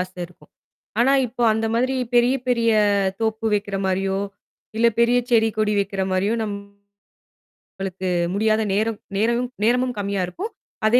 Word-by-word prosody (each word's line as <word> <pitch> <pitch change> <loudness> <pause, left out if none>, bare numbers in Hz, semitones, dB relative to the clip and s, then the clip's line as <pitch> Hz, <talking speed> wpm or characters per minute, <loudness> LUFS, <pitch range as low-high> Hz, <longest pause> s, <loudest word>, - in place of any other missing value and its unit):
ஆசை 185 0 -5
இருக்கும். 165 -4 -22 0.5
ஆனா, 265 +3 +4
இப்போ 245 +1 -5
அந்த 220 +1 -1
மாதிரி 255 +3 +1 0.2
பெரிய 240 +2 +4
பெரிய 235 -2 +2 0.5
தோப்பு 220 0 -1
வைக்கிற 200 -1 -2
மாரியோ, 190 +1 0 0.6
இல்ல 230 +1 +4
பெரியச் 245 +1 +2
செடி, 225 -1 +5
கொடி 215 -1 +2
வைக்கிற 195 0 -2
மாரியோ, 195 +4 +1
நம்மளுக்கு 200 -1 -8 1.3
முடியாத 215 +2 +2
நேரம் 215 +2 0 0.2
நேரமும்-நேரமும் 240 +2 +1
கம்மியா 200 -1 -1
இருக்கும். 385 - -6 0.4
அதே 240 +3 +5
220 Hz, 130 wpm, -22 LUFS, 200-240 Hz, 1.3 s, செடி